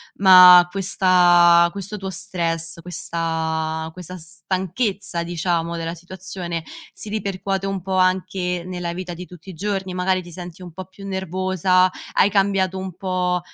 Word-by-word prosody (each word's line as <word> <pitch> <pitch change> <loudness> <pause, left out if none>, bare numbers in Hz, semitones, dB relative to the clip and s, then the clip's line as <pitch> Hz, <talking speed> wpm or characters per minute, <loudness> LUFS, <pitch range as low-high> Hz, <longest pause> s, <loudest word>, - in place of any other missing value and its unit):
ma 180 -2 +9
questa 175 -3 +4
questo 200 +1 -6
tuo 190 -1 -5
stress, 170 -3 -3
questa 160 -2 -3
questa 180 0 -9
stanchezza, 190 +1 -3
diciamo, 170 0 -2
della 165 0 -4
situazione, 175 -1 -6 0.3
si - - -9
ripercuote 195 -2 -3
un 195 -2 -3
po' 190 +1 -3
anche 185 -1 0
nella 175 -2 -4
vita 180 0 -6
di 180 +2 -8
tutti 180 +1 -14
i - - -7
giorni, 190 +1 -3
magari 185 0 0
ti 175 -1 -12
senti 175 0 -9
un 175 -3 -10
po' 185 +1 -8
più 195 +1 -12
nervosa, 185 0 +1 0.2
hai 200 - +3
cambiato 195 -2 +1
un 185 -2 -6
po' 180 -1 -1
185 Hz, 145 wpm, -21 LUFS, 170-190 Hz, 0.3 s, ma